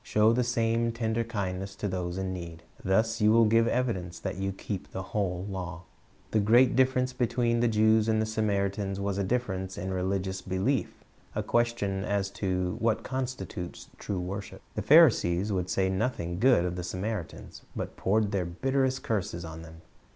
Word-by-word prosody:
Show 110 +2 +3
the 125 +1 +2
same 115 -1 +1
tender 115 0 -1
kindness 95 -3 -4
to 100 - -3
those 90 -2 -3
in 95 -1 -2
need. 85 -2 -7 0.2
Thus 110 +4 +1
you 105 0 +5
will 115 0 +6
give 115 +1 +4
evidence 115 -9 -1
that - - -4
you 95 0 -1
keep 95 0 -6
the 95 - -5
whole 95 -3 -1
law. 90 -2 -5 0.5
The 110 - +3
great 120 +5 +5
difierence 130 0 +2
between 120 -1 +1
the 120 - +3
Jews 110 0 +4
and 110 0 +2
the 110 - +1
Samaritans 100 -2 -1
was 100 0 -1
a - - +1
difference 95 -4 -2
in 95 +2 -3
religious 95 0 -1
belief, 95 +5 0 0.4
a - - -1
question 115 -5 0
as 100 -1 -1
to 90 -3 -1
what 115 -1 +1
constitutes 130 -8 -5
true 100 -3 -3
w^orship. 95 +3 -6
The - - -2
Pharisees 110 - +5
would 90 -2 -1
say 95 0 +1
nothing 95 -3 -2
good 120 -7 +4
of 90 0 -3
the 90 - -3
Samaritans, 95 0 -5
but - - -4
poured 105 +1 +1
their 95 -3 0
bitterest 130 +8 0
curses 100 -5 -2
upon 80 0 -8
them. 80 0 -12
100 Hz, 175 wpm, -28 LUFS, 95-115 Hz, 0.5 s, will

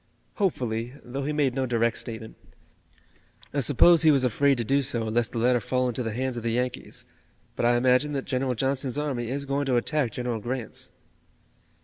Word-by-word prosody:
"Hopefully, 125 - -1
though 135 +3 -5
he 150 - -1
made 145 -4 +1
no 130 0 -1
direct 115 -1 +1
statement. 110 -2 -6 1.2
I 145 - 0
suppose 150 +5 +5
he 160 - +6
was 140 -3 +4
afraid 135 +3 +3
to 120 - -1
do 140 +5 +2
so 120 -3 -1
lest 110 +1 0
the - - -5
letter 120 +2 +3
fall 125 +3 0
into 125 +1 -2
the 115 -2 -2
hands 130 +2 -2
of - - -3
the 115 - -1
Yankees, 125 +1 -3 0.5
but 120 - +1
I 120 0 +4
imagine 130 +4 +3
that 135 -1 -2
General 130 -1 -1
Johnston's 135 +1 -1
army 135 -6 -2
is 140 +2 -3
going 140 +1 -1
to 125 -2 +3
attack 140 0 0
General 120 -2 -2
Grant's." 120 +1 -5
125 Hz, 195 wpm, -26 LUFS, 120-140 Hz, 1.2 s, he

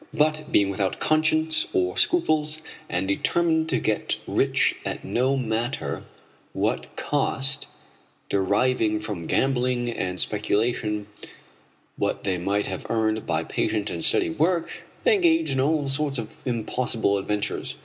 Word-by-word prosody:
But 155 0 +2
being 100 -1 +3
without 95 0 -1
conscience 155 0 +3
or 90 0 +1
scruples, 155 - +2 0.3
and 90 +2 -1
determined 160 - +1
to - - +2
get 110 -1 0
rich - - +2
at - - -4
no 130 +3 +1
matter 110 - -2 0.5
what 60 0 -2
cost, 135 -1 0 0.6
deriving 105 +3 +1
from 105 -6 -5
gambling 125 -2 +1
and 90 -5 -3
speculation 105 0 0 0.9
what - - -1
they 95 -2 -1
might 100 +3 0
have - - -5
earned 110 -1 0
by 80 +1 0
patient 105 +4 -1
and 85 - -4
steady - - +3
work, 170 - 0 0.2
they 475 - +5
engaged 335 -5 +3
in 135 - 0
all 145 +1 +1
sorts 140 0 0
of 115 -3 -5
impossible 115 -3 0
adventures. 105 +1 -2
120 Hz, 130 wpm, -25 LUFS, 100-150 Hz, 0.9 s, they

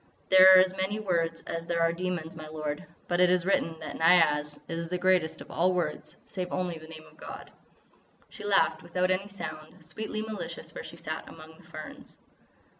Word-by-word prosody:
There 190 0 +10
are - - +10
as 185 0 +3
many 190 +3 -1
words 165 -5 -1
as 165 0 -5
there 170 -1 0
are 165 0 +3
demons, 170 -2 -4
my 155 -1 -8
lord, 155 -1 -5 0.2
but 175 0 0
it 180 0 +6
is 180 -1 +2
written 165 -4 +1
that 155 - -6
Niaz 150 -3 +4
is 165 0 -4
the 180 - -1
greatest 180 -3 +2
of - - -11
all 180 +3 +2
words 155 -3 -3
save 180 -2 -5
only 180 -3 -2
the 160 - -12
name 160 -1 -11
of - - -19
God." - - -9 0.8
She - - -11
laughed 195 -5 +2
without 180 +2 0
any 190 +2 0
sound, 160 -4 -8
sweetly 215 +6 -4
malicious 220 -1 -6
where - - -7
she - - -10
sat - - -6
among 160 0 -13
the - - -19
ferns. - - -10
170 Hz, 195 wpm, -28 LUFS, 160-185 Hz, 0.8 s, There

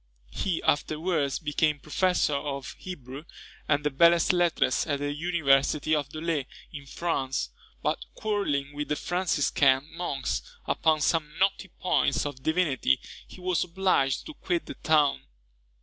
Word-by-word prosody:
He 180 -4 -2
afterwards 155 -1 0
became 150 -1 +1
professor 160 +2 +1
of 140 -1 -3
Hebrew 145 -5 -8 0.4
and 145 0 +2
the 150 - 0
belles 170 +4 +5
lettres 175 -2 +2
at 145 -2 0
the 145 0 -2
University 150 -2 +2
of 145 -2 0
Dôle, 155 -3 -2 0.3
in 140 -2 -8
France; 135 -5 -2 0.3
but 60 - 0
quarrelling 145 -10 -1
with 145 0 -4
the 150 - 0
Franciscan 145 -6 +2
monks 140 -6 -2 0.2
upon 155 -1 +2
some 150 +1 0
knotty 195 0 +1
points 180 -7 0
of 145 -2 -5
divinity, 155 - +1 0.3
he - - -13
was 180 -2 0
obliged 175 -7 +1
to 310 - -8
quit 175 - -2
the - - -7
town. 150 -3 +2
150 Hz, 135 wpm, -27 LUFS, 140-175 Hz, 0.4 s, belles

